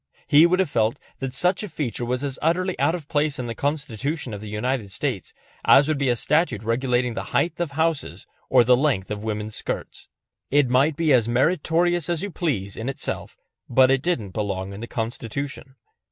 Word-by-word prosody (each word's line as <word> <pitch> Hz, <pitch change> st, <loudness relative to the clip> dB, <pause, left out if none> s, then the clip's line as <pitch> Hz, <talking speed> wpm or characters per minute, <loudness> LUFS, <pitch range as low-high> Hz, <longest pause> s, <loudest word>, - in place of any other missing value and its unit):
He 150 Hz, +4 st, +7 dB
would 180 Hz, +1 st, +2 dB
have 190 Hz, -1 st, +2 dB
felt 115 Hz, -1 st, +1 dB, 0.2 s
that 135 Hz, -1 st, -3 dB
such 180 Hz, +8 st, +2 dB
a 210 Hz, -, -5 dB
feature 140 Hz, -7 st, -3 dB
was 125 Hz, +2 st, -2 dB
as 140 Hz, -1 st, -3 dB
utterly 180 Hz, +3 st, 0 dB
out 165 Hz, -, +2 dB
of 160 Hz, -5 st, -8 dB
place 150 Hz, -2 st, 0 dB
in 125 Hz, -, -4 dB
the 115 Hz, -, -4 dB
Constitution 140 Hz, 0 st, -3 dB
of 100 Hz, -, -6 dB
the 110 Hz, -, -7 dB
United 110 Hz, +1 st, -2 dB
States 105 Hz, -, -3 dB, 0.3 s
as 140 Hz, +1 st, +6 dB
would 155 Hz, -3 st, 0 dB
be 140 Hz, -2 st, +1 dB
a 120 Hz, -, +3 dB
statute 135 Hz, -, +1 dB
regulating 125 Hz, +1 st, 0 dB
the -, -, -4 dB
height 160 Hz, +7 st, 0 dB
of 170 Hz, -5 st, -2 dB
houses 160 Hz, 0 st, -1 dB, 0.2 s
or -, -, +6 dB
the 125 Hz, +2 st, +5 dB
length 125 Hz, -9 st, 0 dB
of 105 Hz, 0 st, -4 dB
women's 105 Hz, 0 st, -4 dB
skirts. -, -, -5 dB, 0.4 s
It 140 Hz, -3 st, +3 dB
might 140 Hz, +4 st, +3 dB
be 160 Hz, -4 st, +3 dB
as 120 Hz, -3 st, +3 dB
meritorious 165 Hz, +5 st, +1 dB
as 170 Hz, 0 st, -1 dB
you 205 Hz, -, -4 dB
please 110 Hz, -, -2 dB
in 115 Hz, +4 st, -4 dB
itself, 135 Hz, -, -4 dB, 0.3 s
but 130 Hz, +1 st, +5 dB
it 135 Hz, -1 st, +2 dB
didn't 130 Hz, -, -1 dB
belong 100 Hz, -2 st, -3 dB
in 100 Hz, -, -8 dB
the 115 Hz, -, -6 dB
Constitution. 125 Hz, +4 st, -5 dB
135 Hz, 200 wpm, -24 LUFS, 115-155 Hz, 0.4 s, He